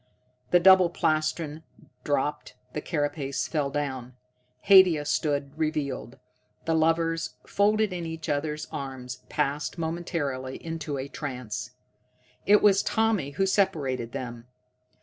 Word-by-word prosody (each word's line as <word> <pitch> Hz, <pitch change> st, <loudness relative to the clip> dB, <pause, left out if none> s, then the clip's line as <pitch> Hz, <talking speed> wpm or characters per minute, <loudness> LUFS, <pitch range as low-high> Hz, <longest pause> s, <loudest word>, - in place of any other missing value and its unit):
The 175 Hz, -, +5 dB
double 185 Hz, 0 st, +7 dB
plastron 155 Hz, -1 st, -1 dB, 0.4 s
dropped, 145 Hz, 0 st, -1 dB, 0.2 s
the 150 Hz, -, -3 dB
carapace 145 Hz, -4 st, -2 dB
fell 150 Hz, -4 st, -1 dB
down: 130 Hz, -4 st, -4 dB, 0.5 s
Haidia 185 Hz, -6 st, +6 dB
stood 145 Hz, -2 st, 0 dB
revealed. 150 Hz, -5 st, -2 dB, 0.5 s
The 165 Hz, -, +1 dB
lovers, 165 Hz, +1 st, +1 dB
folded 210 Hz, 0 st, +2 dB
in 170 Hz, -2 st, -4 dB
each 165 Hz, -1 st, -6 dB
other's 150 Hz, +1 st, -2 dB
arms, 130 Hz, -2 st, -6 dB
passed 150 Hz, +2 st, -1 dB
momentarily 160 Hz, -6 st, -3 dB
into 160 Hz, -3 st, -5 dB
a 135 Hz, +1 st, -4 dB
trance. 125 Hz, -4 st, -5 dB, 0.7 s
It 210 Hz, +1 st, +6 dB
was 200 Hz, -2 st, +6 dB
Tommy 215 Hz, -11 st, 0 dB
who 195 Hz, -, +3 dB
separated 145 Hz, -, 0 dB
them. 120 Hz, -1 st, -6 dB
150 Hz, 115 wpm, -27 LUFS, 140-170 Hz, 0.7 s, double